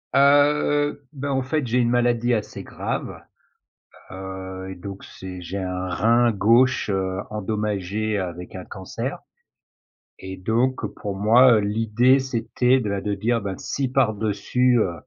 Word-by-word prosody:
Heu, 145 +1 +3
ben 140 0 -4
en 135 -1 0
fait, 145 +1 -1
j'ai 120 +2 0
une 120 -1 +2
maladie 120 0 +2
assez 110 -2 -3
grave. - - -5 0.9
Heu 95 0 -7
et - - -7
donc 95 +2 -9
c'est 90 -1 -9
j'ai 95 +3 -5
un 90 0 -3
rein 115 +6 +3
gauche, 115 +4 +3
heu, 95 -1 -1
endommagé 105 0 -2
avec 90 -1 -5
un 90 - -7
cancer. 95 -1 -5 1.0
Et 95 0 -7
donc 115 +7 0
pour 100 -3 -5
moi, 115 +5 +6
heu, 110 - +4
l'idée 115 +5 +3
c'était 130 0 +1
de 110 - -3
là 100 - -1
de 100 +1 -2
dire, 115 +4 0
ben, 100 -2 -4
si 135 -2 -2
par-dessus, 120 0 +1
heu, 95 -6 +1
110 Hz, 145 wpm, -23 LUFS, 95-125 Hz, 1.0 s, moi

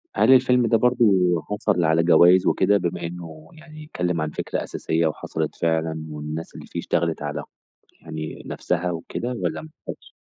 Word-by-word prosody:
هل 120 - +4
الفيلم 125 -1 +4
ده 115 - +4
برضه 125 0 +3 0.4
حصل 90 -4 0
على 80 +1 +3
جوايز 90 +2 +6
وكده، 100 0 +3
بما 85 -2 -3
إنه 80 -2 -9
يعني 155 -1 -12
اتكلم 90 - -2
عن 75 - -1
فكرة - - -3
أساسية 80 0 -1
وحصلت 75 - -4
فعلًا، 80 -1 -1
والناس 75 +2 -6
اللي - - -9
فيه - - -5
اشتغلت 80 -2 -1
على 75 -1 -4 0.6
يعني 80 -1 -7
نفسها 90 0 -2
وكده 85 +8 -4
والّا 125 - -3 0.3
ماخدش؟ - - -9
85 Hz, 160 wpm, -23 LUFS, 80-110 Hz, 0.6 s, جوايز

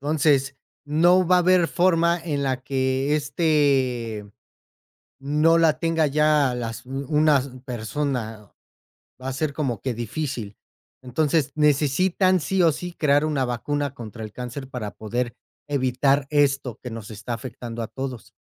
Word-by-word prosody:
Entonces, 140 -2 +1 0.3
no 175 +5 +4
va 180 +1 +5
a - - +5
haber 180 -1 +4
forma 170 -1 +2
en 145 -4 -2
la 130 -2 -1
que 135 +2 0
este 135 -8 0 0.9
no 150 +4 +3
la 160 -2 +3
tenga 165 -2 +1
ya 150 -2 +3
las 115 0 -5
u 135 +1 -5
unas 150 -3 +3 0.2
persona 115 -3 -4 0.7
va 130 - -5
a - - -2
ser 145 +2 -2
como 135 -8 -2
que 130 -2 -2
difícil. 120 -2 -4 0.5
Entonces, 140 +2 0
necesitan 155 +6 +2
sí 185 +5 +1
o 165 - +5
sí 175 +4 -6
crear 145 -2 +2
una 150 -4 0
vacuna 140 +4 -2
contra 115 -3 -8
el 105 - -8
cáncer 125 +3 -7
para 120 -6 -5
poder 120 +2 -3 0.3
evitar 135 0 +1
esto 140 -5 +1
que 125 - -6
nos 115 -2 -8
está 110 +3 -5
afectando 115 -1 -7
a 110 - -5
todos. 130 -3 -6
140 Hz, 145 wpm, -24 LUFS, 125-155 Hz, 0.9 s, va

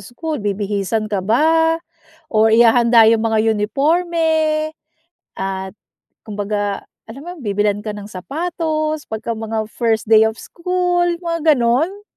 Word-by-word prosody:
school, 295 +4 -5
bibihisan 205 +1 -2
ka 195 - +1
ba 320 - +3 0.5
or 220 -5 +3
ihahanda 235 0 +5
yung 225 0 +3
mga 220 -1 +1 0.2
uniporme, 315 +6 0 0.6
at 190 0 -3 0.6
kumbaga, 205 -1 -3 0.2
alam 250 +6 -10
mo 345 - -10
yun, - - -13
bibilhan 205 0 +1
ka 210 - -3
ng 205 0 -9
sapatos 310 - -3
pagka 220 +1 -5
mga 220 -1 -3
first 225 -2 -1
day 220 0 +7
of 220 - -2
school, 355 +4 -1 0.2
mga 335 -2 +2
gano'n? 280 +11 0
230 Hz, 130 wpm, -18 LUFS, 215-315 Hz, 0.6 s, day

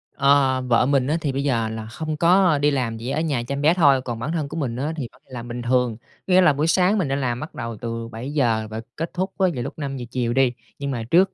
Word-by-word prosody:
Ờ, 140 -2 +3
vợ 120 0 +4
mình 135 -1 +2
á 155 +3 +1
thì 145 - -1
bây 135 +1 -2
giờ 115 -5 +1
là 110 0 -5
không 155 +6 -4
có 175 0 +4
đi 145 +1 +2
làm, 125 -5 -1
chỉ 115 +3 -5
ở 140 - 0
nhà 145 -7 -1
chăm 140 +3 -3
bé 155 +3 +5
thôi, 145 -7 +4
còn 120 -3 -5
bản 125 +7 -3
thân 155 -4 -1
của 155 - -6
mình 130 -7 -2
á 145 +6 -2
thì 140 -6 -4
vẫn 125 - -24
đi 130 - -16
làm 120 -1 -6
bình 120 0 -5
thường. 125 -2 +1 0.3
Có 185 - +1
nghĩa 185 - +7
là 180 -5 +5
buổi 150 +3 0
sáng 185 +4 +3
mình 185 -7 0
đi 135 - 0
làm 125 -3 -1
bắt 155 - -8
đầu 115 -1 -5
từ 115 +1 -5
7:00 115 -1 -1
và 110 +1 -5
kết 165 +2 -4
thúc 190 +2 -2
á 190 - +4
vào 125 -4 -3
lúc 135 - -5
5:00 135 -4 -4
chiều 120 -2 -1
đi, 130 -1 +3 0.3
nhưng 140 0 -3
mà 120 -4 -3
trước 185 +3 +4
135 Hz, 285 wpm, -23 LUFS, 120-155 Hz, 0.3 s, nghĩa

